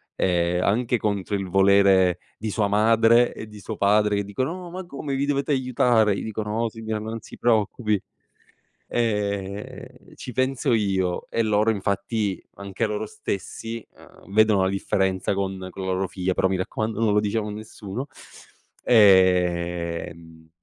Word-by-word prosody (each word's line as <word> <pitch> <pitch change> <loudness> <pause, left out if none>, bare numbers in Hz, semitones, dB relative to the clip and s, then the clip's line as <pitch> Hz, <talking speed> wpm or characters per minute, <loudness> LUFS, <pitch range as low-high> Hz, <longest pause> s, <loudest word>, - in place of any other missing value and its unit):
e 90 -1 +1
anche, 120 +4 +1
contro 100 -2 -2
il 95 -2 -3
volere 95 -2 +4 0.2
di 110 0 -4
sua 105 0 0
madre 115 +3 +4
e 110 - -8
di 105 -1 -12
suo 110 +3 -6
padre, 105 +1 +3
che 100 - 0
dicono: 130 - -3
"No 180 -1 -8
ma 185 +1 -6
come 140 -4 -5
vi 140 - 0
dovete 145 +1 -1
aiutare." 120 -5 +2
Gli - - -4
dico: 110 0 -4
"No 110 +2 -1
signora 110 -1 -4
non 110 +1 -5
si - - -12
preoccupi, 110 -2 +1 0.9
ehm, 100 -3 -3
ci 125 - -8
penso 130 +2 0
io." 95 -4 0
E 115 - -1
loro 110 +1 +2
infatti 100 0 -2
anche 100 +3 -4
loro 105 0 -3
stessi, 115 +4 -5
uhm, 95 - -17
vedono 110 -3 +4
la 95 - +2
differenza 95 -1 0
con 95 -1 -3
con 95 - -8
la 95 - 0
loro 95 +1 0
figlia, 95 0 -2
però 95 - +2
mi 95 - 0
raccomando 110 +4 -3
non 110 -2 +2
lo 105 - +4
diciamo 105 +1 -1
a - - -4
nessuno, 110 +3 -7 0.8
ehm, 85 -5 +2
105 Hz, 160 wpm, -24 LUFS, 95-115 Hz, 0.9 s, volere